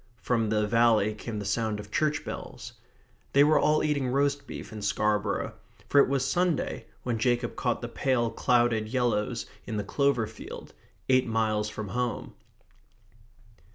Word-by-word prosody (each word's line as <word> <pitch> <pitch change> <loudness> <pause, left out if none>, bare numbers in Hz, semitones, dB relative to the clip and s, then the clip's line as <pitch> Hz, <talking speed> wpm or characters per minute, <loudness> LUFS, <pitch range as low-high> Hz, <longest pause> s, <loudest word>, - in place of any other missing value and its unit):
From 115 -3 0
the 105 0 +2
valley 110 -1 +3
came 110 +1 -6
the 105 - -4
sound 105 +1 -1
of 105 0 -10
church 150 +2 0
bells. - - -7 0.6
They 140 - +7
were 155 +1 +5
all 155 0 +3
eating 145 -3 0
roast 140 +2 0
beef - - -8
in 105 - -6
Scarborough; 105 0 0 0.4
for 140 - +6
it - - +2
was 135 -1 +1
Sunday 175 -3 0 0.2
when 120 -3 -1
Jacob 120 0 0
caught 120 -1 -1
the - - -2
pale 120 -2 0
clouded 120 -2 +2
yellows 120 -2 0 0.2
in 110 - -4
the 105 - -1
clover 140 +2 +1
field, 110 0 -10 0.3
eight 130 -1 +3
miles 110 -2 0
from 105 -1 -6
home. 125 +3 -3
120 Hz, 155 wpm, -28 LUFS, 110-130 Hz, 0.6 s, They